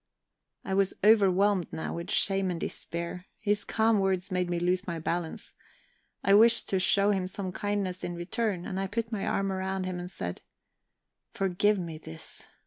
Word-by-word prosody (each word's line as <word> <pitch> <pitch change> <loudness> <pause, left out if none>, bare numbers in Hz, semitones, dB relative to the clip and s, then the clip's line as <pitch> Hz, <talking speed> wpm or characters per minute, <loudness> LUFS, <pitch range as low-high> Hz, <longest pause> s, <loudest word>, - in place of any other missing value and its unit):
I 190 - -2
was 195 0 +2
overwhelmed 200 -3 +4
now 160 - -4
with 170 +1 -5
shame 195 -1 +2
and 175 -2 -2
despair; 170 +3 -5
his 205 -1 0
calm 220 -1 +2
words 190 0 0
made 180 -1 0
me 175 - 0
lose 180 +2 0
my 170 -2 -2
balance. 165 +1 -3 0.7
I 195 - +4
wished 230 +3 +6
to 190 - +2
show 200 +2 +4
him 190 -2 0
some 185 0 -5
kindness 195 -2 -2
in 175 - -3
return, 180 +2 -2
and 190 - -3
I 195 - -1
put 230 +3 -3
my 210 -3 -2
arm 195 0 0
round 190 0 -2
him, 185 -1 -3
and 175 0 -6
said: 90 - -5 0.9
"Forgive 200 +2 +2
me 165 -4 -5
this! 80 - -8
190 Hz, 175 wpm, -29 LUFS, 180-200 Hz, 0.9 s, wished